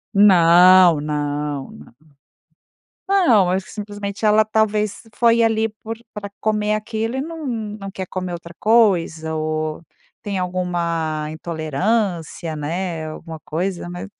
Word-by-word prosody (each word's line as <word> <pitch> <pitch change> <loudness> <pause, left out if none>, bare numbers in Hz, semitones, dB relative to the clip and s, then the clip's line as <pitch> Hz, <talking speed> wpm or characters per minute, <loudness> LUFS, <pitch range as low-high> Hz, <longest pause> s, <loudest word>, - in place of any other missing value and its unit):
Não, 180 -3 +7
não, 145 -1 -3
não. 75 +10 -15 1.1
Não. 275 - +4
Eu - - 0
acho 190 +1 0
que - - -13
simplesmente 205 0 -4
ela, 215 +1 +5
talvez, 215 -1 0
foi 235 +1 +4
ali 225 -1 +2
por 225 +1 -5 0.2
pra 200 -1 -7
comer 210 -1 0
aquilo 220 +3 -3
e - - -1
não 320 -1 -7
não 210 -4 -5
quer 190 -1 -5
comer 185 -1 -4
outra 170 0 -9
coisa. 175 -8 +2
Ou 155 0 -2 0.4
tem 200 -2 -3
alguma 170 -4 -2
intolerância, 165 +1 -2
né, 165 +2 -3
alguma 160 0 -8
coisa. 175 +3 -3
Mas 175 +3 -6
185 Hz, 130 wpm, -20 LUFS, 160-215 Hz, 1.1 s, Não